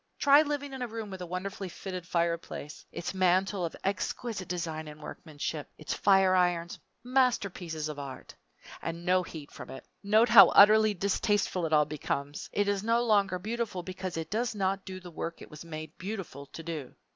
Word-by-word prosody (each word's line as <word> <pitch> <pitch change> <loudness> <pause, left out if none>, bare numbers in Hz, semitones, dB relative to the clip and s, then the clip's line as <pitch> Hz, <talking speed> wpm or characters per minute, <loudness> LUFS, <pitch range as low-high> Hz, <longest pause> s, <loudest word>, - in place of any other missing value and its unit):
Try 285 +1 +7
living 290 -2 -3
in 265 - -6
a 245 - -1
room 220 -2 -6
with 190 -1 -7
a 180 - -5
wonderfully 190 +2 -4
fitted 180 -1 -7
fireplace; 170 -3 -2
its 175 - -4
mantel 185 +1 +2
of 165 - -3
exquisite 195 0 -2
design 160 -3 -3
and 150 0 -10
workmanship, 155 -1 -6
its 155 - -4
fire 195 -2 +4
irons 175 -2 +1 0.2
masterpieces 200 - 0
of 150 -1 -6
art 135 -2 -8 0.5
and 170 +1 -5
no 185 0 +4
heat 160 -4 -9
from - - -10
it! 135 - -9 0.2
Note 215 +3 +4
how 200 -6 +10
utterly 215 +1 +7
distasteful 195 -2 0
it 160 - -3
all 150 -1 +5
becomes. 145 -1 -4
It 205 0 +1
is 200 -1 0
no 230 +2 +2
longer 200 -5 +3
beautiful 215 -1 -3
because 185 -1 -5
it 165 +1 -5
does 230 +1 -1
not 195 -1 -1
do 185 0 -6
the 180 -1 -11
work 165 +1 -5
it - - -12
was 150 +1 -9
made 155 -1 -8
beautiful 185 -8 -6
to 165 - -9
do. 155 -5 -6
185 Hz, 185 wpm, -30 LUFS, 165-205 Hz, 0.5 s, how